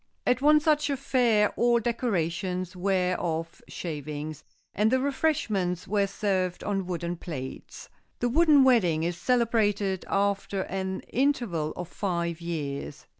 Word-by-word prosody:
At 250 +1 +2
one 300 +1 +6
such 300 -1 +2
affair 245 -6 +2
all 240 0 +3
decorations 185 -5 -2
were 185 -1 +1
of 165 0 -3
shavings, 150 -2 -6 0.3
and 210 +2 +2
the 260 - +3
refreshments 225 - 0
were 200 0 +1
served 190 -3 -1
on 195 -3 -2
wooden 175 -1 -3
plates. 135 -7 -7 0.3
The 245 - 0
Wooden 295 +1 +5
Wedding 185 -12 +3
is 175 +1 -1
celebrated 210 -4 +1
after 200 -1 0
an 190 0 -3
interval 240 - 0
of 180 - -5
five 170 -3 -2
years. 145 -4 -5
195 Hz, 125 wpm, -27 LUFS, 170-240 Hz, 0.3 s, one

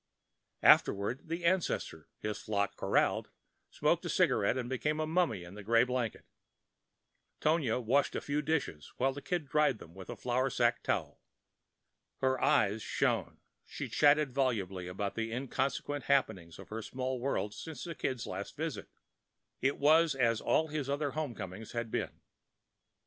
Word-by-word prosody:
Afterward, 100 +9 +4
the 170 +2 -3
ancestor, 170 - 0
his 105 0 -4
flock 100 -2 -1
corralled, - - +1 0.4
smoked - - +1
a - - -4
cigarette 100 +5 +2
and 125 -2 -2
became 150 +4 -1
a 155 - +1
mummy 155 - +1
in 90 +3 -11
a 105 - -8
grey 115 +3 +4
blanket. 125 -3 -2 1.1
Tonia 150 -7 +2
washed 130 +4 +2
the - - -2
few 145 +1 -1
dishes 150 - -2
while 135 +1 +2
the 145 - -7
Kid 175 -1 -2
dried 150 -4 +2
them 85 - -13
with 95 0 -10
the - - -5
flour 125 +2 0
sacking 120 -2 +2
towel. - - -2 1.0
Her 130 -1 +1
eyes 110 -7 +3
shone; - - -1 0.2
she - - -6
chatted 145 -1 +4
volubly 100 -9 -1
of 90 +1 -8 0.2
the 115 0 -3
inconsequent 135 +2 -2
happenings 105 -12 +1
of - - -12
her 110 +1 -4
small 130 +3 -3
world 120 -5 -1
since 160 +5 -7
the 170 - -5
Kid's 130 -6 -3
last - - -6
visit; - - -4 0.7
it 140 +2 +1
was 155 +1 +5
as 115 -4 +2
all 160 0 +2
his 145 -2 -3
other 145 0 0
home 150 -5 -3
comings 95 +2 -7
had 115 -2 -3
been. - - -3
130 Hz, 160 wpm, -32 LUFS, 110-145 Hz, 1.1 s, was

